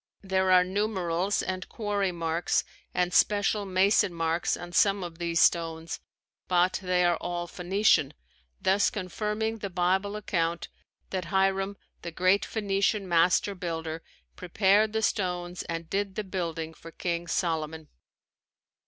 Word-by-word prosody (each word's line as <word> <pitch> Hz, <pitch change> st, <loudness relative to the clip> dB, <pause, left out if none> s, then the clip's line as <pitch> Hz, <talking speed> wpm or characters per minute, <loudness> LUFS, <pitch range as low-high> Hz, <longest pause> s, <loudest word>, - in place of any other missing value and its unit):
There 190 Hz, -1 st, +1 dB
are 180 Hz, 0 st, +7 dB
numerals 190 Hz, -1 st, -1 dB
and 185 Hz, 0 st, -4 dB
quarry 205 Hz, -4 st, -1 dB
marks 165 Hz, 0 st, 0 dB, 0.3 s
and 180 Hz, 0 st, 0 dB
special 205 Hz, 0 st, +3 dB
mason 195 Hz, +1 st, +3 dB
marks 165 Hz, +1 st, 0 dB
on 175 Hz, 0 st, -8 dB
some 195 Hz, +2 st, +3 dB
of 170 Hz, -1 st, -8 dB
these 170 Hz, -1 st, 0 dB
stones 165 Hz, -1 st, +1 dB, 0.5 s
but 180 Hz, 0 st, +2 dB
they 180 Hz, -1 st, +2 dB
are 175 Hz, -1 st, +3 dB
all 175 Hz, 0 st, -3 dB
Phoenician, 180 Hz, -4 st, +2 dB, 0.4 s
thus 195 Hz, +2 st, +3 dB
confirming 210 Hz, +3 st, -3 dB
the 200 Hz, -, -4 dB
Bible 190 Hz, +3 st, 0 dB
account 170 Hz, -5 st, -2 dB, 0.4 s
that 185 Hz, -2 st, -2 dB
Hiram, 195 Hz, +1 st, +1 dB, 0.2 s
the 170 Hz, -, -5 dB
great 185 Hz, +4 st, +2 dB
Phoenician 200 Hz, -1 st, 0 dB
master 175 Hz, +3 st, +3 dB
builder 165 Hz, -3 st, -4 dB, 0.3 s
prepared 200 Hz, +4 st, +2 dB
the 220 Hz, 0 st, 0 dB
stones 180 Hz, -4 st, -1 dB
and 165 Hz, -1 st, -4 dB
did 195 Hz, +1 st, -2 dB
the 215 Hz, -, -2 dB
building 165 Hz, -4 st, -4 dB
for 165 Hz, -, -12 dB
King 170 Hz, 0 st, -3 dB
Solomon. 160 Hz, -2 st, -2 dB
185 Hz, 135 wpm, -28 LUFS, 170-200 Hz, 0.5 s, are